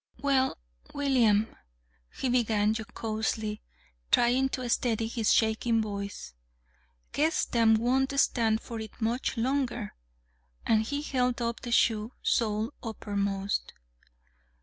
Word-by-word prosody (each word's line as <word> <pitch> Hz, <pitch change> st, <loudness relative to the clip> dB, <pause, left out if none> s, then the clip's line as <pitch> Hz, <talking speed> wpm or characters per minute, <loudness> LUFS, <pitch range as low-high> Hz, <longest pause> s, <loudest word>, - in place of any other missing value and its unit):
"Well, 270 Hz, -2 st, +1 dB, 0.4 s
William," 240 Hz, -7 st, +2 dB, 0.6 s
he -, -, -1 dB
began 220 Hz, -4 st, +2 dB
jocosely, 220 Hz, -1 st, -3 dB, 0.5 s
trying 250 Hz, +3 st, +3 dB
to 255 Hz, -2 st, -3 dB
steady 230 Hz, -2 st, +1 dB
his 225 Hz, -1 st, 0 dB
shaking 225 Hz, +1 st, +2 dB
voice, 200 Hz, -, -5 dB, 0.8 s
"guess 315 Hz, +3 st, +1 dB
them 225 Hz, -2 st, +4 dB
won't 265 Hz, +4 st, +1 dB
stand 225 Hz, -4 st, +2 dB
for 230 Hz, -1 st, -7 dB
it 220 Hz, 0 st, -9 dB
much 235 Hz, +3 st, -1 dB
longer!" 245 Hz, -3 st, -1 dB, 0.7 s
And 220 Hz, -1 st, +3 dB
he 285 Hz, +6 st, -3 dB
held 250 Hz, -4 st, 0 dB
up 235 Hz, -1 st, -2 dB
the 240 Hz, -, -6 dB
shoe, 225 Hz, 0 st, +2 dB
sole 220 Hz, +2 st, 0 dB
uppermost. 200 Hz, -3 st, -2 dB
230 Hz, 110 wpm, -29 LUFS, 220-250 Hz, 0.8 s, them